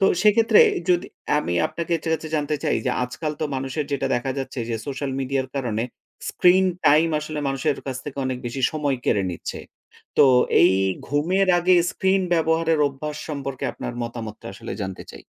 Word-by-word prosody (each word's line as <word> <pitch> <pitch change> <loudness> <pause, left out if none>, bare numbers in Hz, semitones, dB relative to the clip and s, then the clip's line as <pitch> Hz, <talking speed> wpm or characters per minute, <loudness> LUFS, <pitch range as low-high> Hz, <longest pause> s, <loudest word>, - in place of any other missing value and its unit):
তো 195 - +4 0.2
সেক্ষেত্রে 220 +1 +5
এ - - -1 0.2
যদি 175 0 +2 0.3
আমি 85 -11 -2
আপনাকে 170 0 -4
ছে - - -2
কাছে 160 0 -2
জানতে 150 0 -1
চাই - - +2
যে - - +2
আজকাল 150 +5 -3
তো - - +1
মানুষের 135 +3 -2
যেটা 135 -1 0
দেখা 125 +2 -1
যাচ্ছে 135 -1 -5
যে 115 - 0
সোশ্যাল 140 0 -3
মিডিয়ার 135 0 -1
কারণে 115 -4 -1 0.5
স্ক্রিন 185 +1 +4 0.2
টাইম 155 +3 +5
আসলে 155 0 -5
মানুষের 135 +2 0
কাছ 130 -2 -3
থেকে 140 -1 -7
অনেক 130 -1 -2
বেশি 130 +2 -4
সময় 145 -3 0
কেড়ে 100 - +2
নিচ্ছে। 85 - -6 0.6
তো - - +8 0.4
এই - - +6 0.4
ঘুমের 180 +7 +1
আগে 180 +1 +4 0.2
স্ক্রিন 190 0 +1
ব্যবহারের 160 0 +2
অভ্যাস 150 +2 -6
সম্পর্কে 140 -3 -4
আপনার - - -6
মতামতটা 115 -2 -6
আসলে - - -7
জানতে 95 -1 -6
চাই। - - -12
145 Hz, 175 wpm, -23 LUFS, 130-165 Hz, 0.6 s, তো